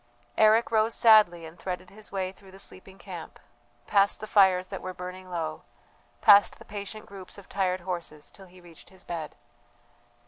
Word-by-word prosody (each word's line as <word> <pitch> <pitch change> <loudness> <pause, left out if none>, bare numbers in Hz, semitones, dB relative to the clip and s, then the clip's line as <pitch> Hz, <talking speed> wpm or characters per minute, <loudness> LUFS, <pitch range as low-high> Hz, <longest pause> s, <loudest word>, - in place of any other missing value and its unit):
Eric 220 +2 +4
rose 220 0 +2
sadly 210 -8 +5
and 160 +2 -12
threaded 180 -1 -6
his 215 +1 -10
way 190 -1 -2
through 195 0 -19
the 190 - -14
sleeping 190 0 -8
camp, 180 -5 -9 0.5
past 200 -1 +2
the - - -6
fires 190 -3 +4
that 195 - -6
were 185 0 -6
burning 185 +1 -8
low, 160 -3 -4 0.6
past 200 0 +6
the - - -15
patient 205 +1 -7
groups 195 -1 -10
of 200 - -13
tired 185 -2 -1
horses, 170 -4 -6
till 195 -1 -15
he 180 +1 -17
reached 175 -2 -16
his 190 0 -14
bed. 165 -3 -6
190 Hz, 175 wpm, -27 LUFS, 180-200 Hz, 0.6 s, past